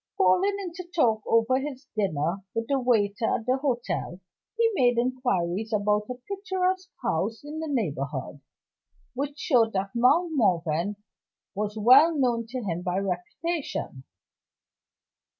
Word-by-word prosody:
Falling 380 - +3
into 365 -1 -6
talk 225 -9 +3
over 230 +3 +3
his 270 -1 -6
dinner 170 -4 0 0.2
with 230 0 -1
the 275 -1 +1
waiter 225 -3 +1
at 230 - -10
the 255 +2 +2
hotel, 240 - -2 0.4
he 460 0 +3
made 245 -9 +3
inquiries 225 -5 0
about 210 0 +1
a 250 - -3
picturesque 375 -1 -1
house 210 - -1
in 300 +2 -6
the 320 - -4
neighborhood, 145 - -3 0.7
which 280 +3 -4
showed 235 -9 +2
that 195 0 -2
Mount 320 +9 +3
Morven 180 - +1 0.6
was 210 +2 -3
well 275 +9 +6
known 240 -4 +1
to 250 +1 -5
him 175 -3 -3
by 180 0 -2
reputation. 195 - -3
235 Hz, 135 wpm, -26 LUFS, 195-285 Hz, 0.7 s, well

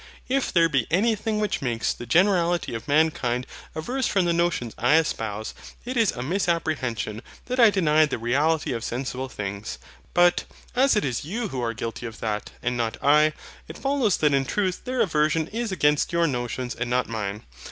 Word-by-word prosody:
If 270 +1 0
there 170 -2 +4
be 140 -7 0
anything 215 +4 +1
which 210 -2 -1
makes 120 -4 0
the 120 - -9
generality 175 - +2
of 115 0 -6
mankind 140 -5 +1 0.3
averse 250 +12 -1
from 195 -3 +2
the 170 - +2
notions 170 -9 0
I 125 +6 +4
espouse, 110 -9 -1 0.3
it 255 +1 -4
is 230 -4 +3
a 125 - -5
misapprehension 155 - -1 0.2
that 255 +1 -3
I 230 -2 +8
deny 155 -6 +3
the - - -3
reality 145 +7 +1
of 115 -1 -4
sensible 130 +1 -3
things. 100 -1 -5 0.4
But, 175 0 +4 0.3
as 270 +1 +4
it 210 - +1
is 125 -4 -2
you 215 +8 -3
who 130 -5 -4
are 115 -1 -2
guilty 115 +2 -5
of 115 0 -10
that, 105 -2 -3
and 125 0 0
not 115 -2 -2
I, 150 +2 +5 0.3
it 160 - -9
follows 270 -7 +1
that 150 -2 +2
in 135 -1 +3
truth 185 +5 -1
their 255 -1 0
aversion 155 -4 +2
is 230 0 -3
against 150 -5 +2
your 170 0 +2
notions 125 -2 -2
and 120 +1 -4
not 125 +1 +1
mine. 105 -2 -4
155 Hz, 185 wpm, -25 LUFS, 120-185 Hz, 0.4 s, I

